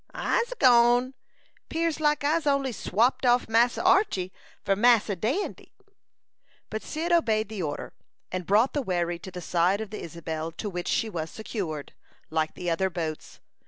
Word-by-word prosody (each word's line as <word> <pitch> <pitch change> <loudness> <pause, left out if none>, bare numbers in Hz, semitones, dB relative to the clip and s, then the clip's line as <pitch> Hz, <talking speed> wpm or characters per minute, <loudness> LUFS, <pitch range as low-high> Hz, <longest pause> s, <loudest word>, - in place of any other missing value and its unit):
"I'se 480 +1 0
gone; 245 - +5 0.6
'pears 330 -1 -1
like 300 -1 +2
I'se 305 +1 +1
only 275 -2 +2
swapped 230 +4 +1
off 245 0 +3
Massa 235 +6 +2
Archy 365 - +2 0.3
for 195 - +3
Massa 220 -1 +4
Dandy." 245 - -3 1.0
But 220 0 -3
Cyd 330 +3 -3
obeyed 220 -11 +2
the 215 -3 -5
order, 145 -3 -4 0.4
and 185 -2 -4
brought 215 +6 +3
the 290 - 0
wherry 175 -6 -1
to 190 - -9
the 180 -1 -8
side 175 +3 +1
of 220 -2 -6
the 215 - -6
Isabel, 160 -1 -5
to 205 +5 -5
which 175 -1 -4
she 225 - +1
was 165 -6 -4
secured, 175 -9 -5 0.4
like 160 -1 -1
the 180 - -6
other 175 +3 +1
boats. 160 -3 -5
215 Hz, 160 wpm, -27 LUFS, 175-260 Hz, 1.0 s, gone